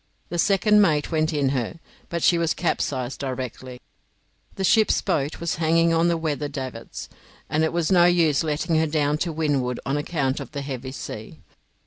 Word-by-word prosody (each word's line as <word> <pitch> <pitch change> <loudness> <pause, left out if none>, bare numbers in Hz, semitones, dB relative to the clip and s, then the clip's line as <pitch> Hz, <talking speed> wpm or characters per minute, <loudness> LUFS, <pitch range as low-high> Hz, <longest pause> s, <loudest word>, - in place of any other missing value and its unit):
The 175 - -3
second 210 +3 +4
mate 155 -6 +2
went 155 0 +1
in 145 -3 +1
her, 130 +4 -2 0.3
but 170 -1 -3
she 170 - +4
was 165 -1 +1
capsized 135 -6 -2
directly. 130 -1 -5 0.8
The 195 - -3
ship's 215 +3 +4
boat 150 -6 -1
was 170 -2 -2
hanging 165 +1 +3
on 165 +1 +3
the 170 -1 +2
weather 150 -2 -2
davits, 130 -5 -7 0.4
and 155 +1 0
it 160 - +1
was 170 +1 0
no 175 -2 +6
use 165 -5 +3
letting 160 +1 0
her 160 - +2
down 150 -1 0
to 170 - -1
windward 145 -6 -1
on 140 +1 0
account 145 -3 -1
of - - -8
the 140 -1 -4
heavy 130 -2 -5
sea. 135 - -8
155 Hz, 180 wpm, -24 LUFS, 140-170 Hz, 0.8 s, no